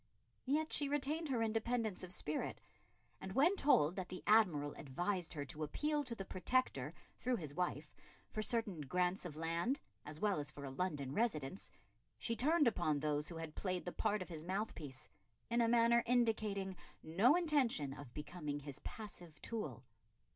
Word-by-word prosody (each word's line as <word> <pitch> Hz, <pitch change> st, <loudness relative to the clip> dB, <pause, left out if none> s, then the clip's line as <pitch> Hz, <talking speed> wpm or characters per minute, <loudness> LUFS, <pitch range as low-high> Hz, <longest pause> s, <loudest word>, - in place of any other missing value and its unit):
Yet 305 Hz, +3 st, +1 dB
she 285 Hz, -1 st, +2 dB
retained 295 Hz, +3 st, 0 dB
her 240 Hz, -4 st, +2 dB
independence 225 Hz, -1 st, 0 dB
of 185 Hz, -, -5 dB
spirit, 150 Hz, -4 st, -1 dB, 0.6 s
and 190 Hz, 0 st, -5 dB
when 315 Hz, -, +5 dB
told 175 Hz, -, +4 dB
that 185 Hz, -1 st, -3 dB
the 185 Hz, -, -6 dB
Admiral 170 Hz, -10 st, +4 dB
advised 175 Hz, +6 st, -2 dB
her 145 Hz, -3 st, -3 dB
to 150 Hz, +3 st, -7 dB
appeal 295 Hz, -, 0 dB
to 240 Hz, -2 st, -2 dB
the 195 Hz, -, -5 dB
Protector 250 Hz, +8 st, 0 dB, 0.2 s
through 250 Hz, 0 st, +1 dB
his 155 Hz, -9 st, -4 dB
wife 160 Hz, -3 st, -2 dB, 0.4 s
for 215 Hz, -, -1 dB
certain 215 Hz, -7 st, -1 dB
grants 180 Hz, +6 st, 0 dB
of 160 Hz, -4 st, -5 dB
land, 170 Hz, -, 0 dB, 0.2 s
as 150 Hz, +1 st, -6 dB
well 205 Hz, -4 st, +2 dB
as 145 Hz, 0 st, -1 dB
for 140 Hz, -1 st, -8 dB
a 135 Hz, -, -5 dB
London 140 Hz, -3 st, -2 dB
residence, 190 Hz, -, -1 dB, 0.5 s
she 230 Hz, -, -1 dB
turned 300 Hz, +4 st, +4 dB
upon 165 Hz, -9 st, +2 dB
those 150 Hz, 0 st, 0 dB
who 170 Hz, -, -7 dB
had 165 Hz, -1 st, -5 dB
played 185 Hz, 0 st, -2 dB
the 180 Hz, -, -2 dB
part 210 Hz, -1 st, 0 dB
of -, -, -14 dB
his 160 Hz, -3 st, -6 dB
mouthpiece 170 Hz, -8 st, -4 dB, 0.4 s
in 235 Hz, 0 st, +4 dB
a 230 Hz, -, +4 dB
manner 235 Hz, 0 st, +5 dB
indicating 215 Hz, -5 st, +2 dB, 0.3 s
no 200 Hz, -, +5 dB
intention 275 Hz, -, +2 dB
of 140 Hz, -3 st, -9 dB
becoming 150 Hz, 0 st, -4 dB
his 140 Hz, -1 st, -7 dB
passive 175 Hz, -8 st, -8 dB
tool. 145 Hz, -, -4 dB
185 Hz, 170 wpm, -38 LUFS, 150-235 Hz, 0.6 s, when